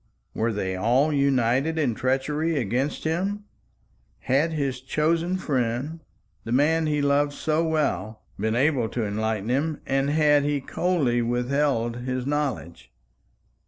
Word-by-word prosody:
Were 115 +1 0
they 95 -3 -2
all 125 +10 +2
united 140 +2 +2
in 140 -7 +1
treachery 145 +6 0
against 130 +4 -1
him? 190 +6 -1 0.8
Had 140 +6 +1
his 140 -5 -2
chosen 165 +6 0
friend 135 0 -2 0.4
the 115 - -6
man 155 +5 +3
he 150 -1 0
loved 145 +1 +2
so 155 +2 0
well 115 - -1 0.2
been 110 +2 0
able 130 -3 +2
to 115 -3 -2
enlighten 110 +1 -2
him, 145 +5 0
and 135 +1 0
had 150 -1 +4
he 145 0 0
coldly 140 -5 0
withheld 120 0 0
his 130 0 -3
knowledge? 135 - -3
140 Hz, 130 wpm, -25 LUFS, 120-150 Hz, 0.8 s, had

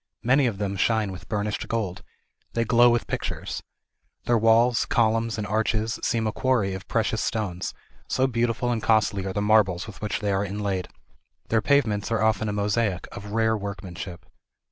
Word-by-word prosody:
Many 130 +2 +4
of 110 -5 -2
them 100 -1 -2
shine 110 0 +1
with 90 -1 -10
burnished 105 -1 -2
gold. 100 -6 -2 0.5
They 115 0 +1
glow 120 +2 +6
with 120 -1 +1
pictures. - - -4 0.6
Their 120 - +3
walls, 115 +2 +4
columns, 115 0 +1
and 105 - -2
arches 110 +1 0
seem 115 -1 0
a 110 - 0
quarry 110 -6 +1
of 95 +1 -7
precious 110 -1 0
stones, 95 -5 -3 0.3
so 130 - +1
beautiful 120 -1 0
and 115 -2 -1
costly 110 -3 +2
are 95 - -3
the 105 - -1
marbles 105 -4 +3
with 105 - -11
which 105 - -2
they 105 -2 -1
are 95 0 +1
inlaid. 100 -2 -2 0.6
Their 110 -1 +3
pavements 110 -5 +1
are 110 -1 +1
often 110 -1 +2
a - - -1
mosaic, 105 -2 0
of 100 0 -8
rare 110 0 +2
workmanship. 95 -3 -6
110 Hz, 175 wpm, -25 LUFS, 100-115 Hz, 0.6 s, glow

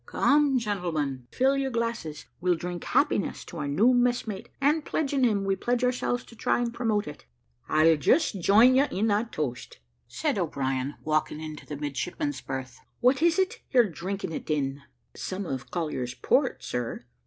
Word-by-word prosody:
Come, 285 -2 +3
gentlemen, 160 - -2
fill 265 +2 +2
your 275 -1 0
glasses; 230 - -3
we'll 180 0 +2
drink 175 +1 -5
happiness 275 -5 +1
to 175 - -9
our 145 - -2
new 215 - +4
messmate, 245 -4 0
and 295 +3 +2
pledging 280 -4 0
him, 210 -5 +2
we 195 0 +1
pledge 245 +5 -1
ourselves 250 -1 0
to 230 - -15
try 240 +2 +1
to 235 - -3
promote 225 -3 0
it." 150 - -10 0.4
"I'll 155 +1 +5
just 205 - +2
join 220 +8 +6
you 275 +3 +4
in 205 0 0
that 215 +3 0
toast," 130 -5 -4 0.3
said - - -1
O'Brien, 135 0 -2
walking 155 0 0
into 155 -1 -8
the 145 - -5
midshipmen's 145 - -3
berth. 130 -2 -6 0.2
"What 255 +3 +3
is 335 +1 +4
it 380 -1 0
you're 245 -4 +5
drinking 185 +3 -4
it 160 - -6
in?" 140 -2 -1 0.3
"Some 190 +1 -4
of 135 -5 -5
Collier's 130 -8 -3
port, 265 -1 +1
sir. 125 -1 -4
200 Hz, 170 wpm, -27 LUFS, 150-250 Hz, 0.4 s, join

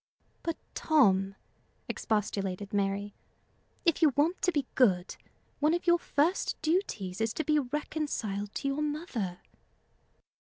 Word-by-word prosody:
"But, 330 -1 -2 0.2
Tom," 195 -11 +3 0.5
expostulated 200 -2 -2
Mary, 200 0 0 0.7
"if 335 -1 +3
you 315 - +7
want 320 +6 +2
to 365 - +3
be 290 -5 0
good, 190 -8 +3 0.4
one 305 +3 +3
of 345 - -3
your 345 0 +5
first 330 +4 +1
duties 225 - -1
is 225 0 0
to 315 - -1
be 305 -1 +3
reconciled 250 -7 -3
to - - -2
your 275 +2 0
mother." 290 - -3
275 Hz, 125 wpm, -30 LUFS, 200-315 Hz, 0.7 s, you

